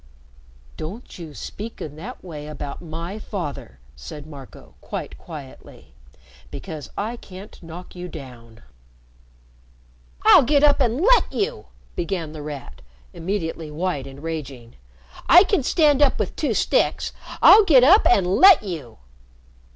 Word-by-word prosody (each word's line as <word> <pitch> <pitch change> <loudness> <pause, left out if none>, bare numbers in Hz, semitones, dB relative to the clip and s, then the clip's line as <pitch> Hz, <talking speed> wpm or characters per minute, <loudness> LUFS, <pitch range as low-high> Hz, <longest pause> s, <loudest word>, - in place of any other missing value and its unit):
"Don't 190 +6 -8
you 160 -4 -9
speak 225 +3 -8
in 150 -1 -7
that 220 +11 -9
way 150 -5 -8
about 145 -2 -7
my 170 +5 -6
father," 145 - -6 0.2
said 65 - -10
Marco, 140 -4 -13
quite - - -6
quietly, 145 -6 -12 0.6
"because 155 - -8
I 225 +4 -3
can't 195 -1 -12
knock 175 +2 -10
you 180 0 -7
down." 120 -8 -12 1.6
"I'll - - +8
get 285 +2 +2
up 290 -1 +4
and 240 0 +1
let 485 +8 +4
you!" 465 +4 -3 0.3
began 170 -3 -3
The 155 -1 -8
Rat, 145 - -8 0.3
immediately 165 -3 -4
white 150 -3 -3
and 135 +2 -12
raging. 135 -7 -6 0.6
"I 355 +3 +9
can 395 -4 +1
stand 295 +1 +3
up 285 - +4
with - - -3
two - - -1
sticks. - - +1 0.3
I'll 435 - +8
get 280 -10 +6
up 370 - +7
and 195 - +4
let 345 - +6
you!" 155 - -7
170 Hz, 135 wpm, -22 LUFS, 150-240 Hz, 1.6 s, I